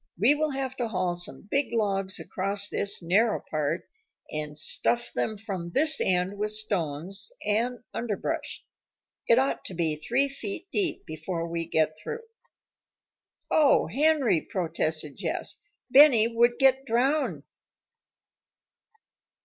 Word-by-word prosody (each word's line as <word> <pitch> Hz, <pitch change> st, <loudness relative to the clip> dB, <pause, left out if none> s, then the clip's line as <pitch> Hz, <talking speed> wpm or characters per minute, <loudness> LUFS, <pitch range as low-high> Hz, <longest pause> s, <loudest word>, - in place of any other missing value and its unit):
"We 225 Hz, -, +5 dB
will 305 Hz, +1 st, 0 dB
have 270 Hz, -2 st, -3 dB
to 240 Hz, -, -1 dB
haul 185 Hz, -4 st, -1 dB
some 175 Hz, +3 st, -8 dB
big 280 Hz, +1 st, +2 dB
logs 195 Hz, -4 st, 0 dB
across 200 Hz, +2 st, -1 dB
this 200 Hz, -2 st, -2 dB
narrow 210 Hz, +6 st, +2 dB
part 155 Hz, +2 st, -1 dB, 0.4 s
and 150 Hz, -1 st, -4 dB
stuff 240 Hz, +9 st, 0 dB
them 220 Hz, -1 st, -2 dB
from 195 Hz, -5 st, -5 dB
this 310 Hz, +2 st, +4 dB
end 185 Hz, +2 st, 0 dB
with 210 Hz, 0 st, 0 dB
stones 195 Hz, -, -2 dB
and 235 Hz, +3 st, 0 dB
underbrush. 225 Hz, -4 st, -3 dB, 0.6 s
It 230 Hz, -, +5 dB
ought 265 Hz, +1 st, +1 dB
to 185 Hz, -, -7 dB
be 165 Hz, -2 st, +1 dB
three 240 Hz, -, +1 dB
feet 275 Hz, -, -6 dB
deep 390 Hz, -4 st, +1 dB
before 165 Hz, +2 st, -4 dB
we 165 Hz, -1 st, -3 dB
get 155 Hz, -1 st, 0 dB
through." 455 Hz, -, -6 dB, 1.3 s
"O 295 Hz, -3 st, +4 dB
Henry!" 285 Hz, -, +2 dB
protested 160 Hz, -4 st, -2 dB
Jess. -, -, -4 dB, 0.3 s
"Benny 240 Hz, -5 st, +7 dB
would 240 Hz, +1 st, +3 dB
get 270 Hz, 0 st, +4 dB
drowned." 270 Hz, +5 st, 0 dB
210 Hz, 125 wpm, -27 LUFS, 175-260 Hz, 1.3 s, Benny